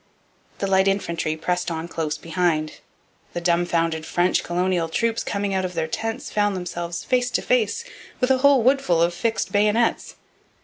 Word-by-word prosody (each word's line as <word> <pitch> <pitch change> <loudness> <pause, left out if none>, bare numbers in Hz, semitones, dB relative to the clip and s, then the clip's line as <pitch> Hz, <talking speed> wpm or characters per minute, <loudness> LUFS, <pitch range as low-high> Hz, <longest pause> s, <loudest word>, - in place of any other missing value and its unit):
The - - -2
light 190 0 +3
infantry 170 -5 -1
pressed 180 +2 -1
on 165 0 -4
close 160 -2 -3
behind. 165 -1 -1 0.5
The - - -2
dumbfounded 170 -2 +1
French 175 +3 +1
colonial 175 -1 0
troops 230 +6 0
coming 200 -1 -2
out 190 -1 0
of 180 -1 -4
their - - 0
tents 225 +7 -4
found 205 -1 +1
themselves 175 -1 -4
face 250 -1 +1
to - - 0
face 250 - +1 0.4
with 250 0 +2
a 260 - +3
whole 280 -2 +5
woodful 260 -9 +3
of 170 +1 +2
fixed 225 +5 -1
bayonets. 210 +3 +1
180 Hz, 165 wpm, -23 LUFS, 170-220 Hz, 0.5 s, whole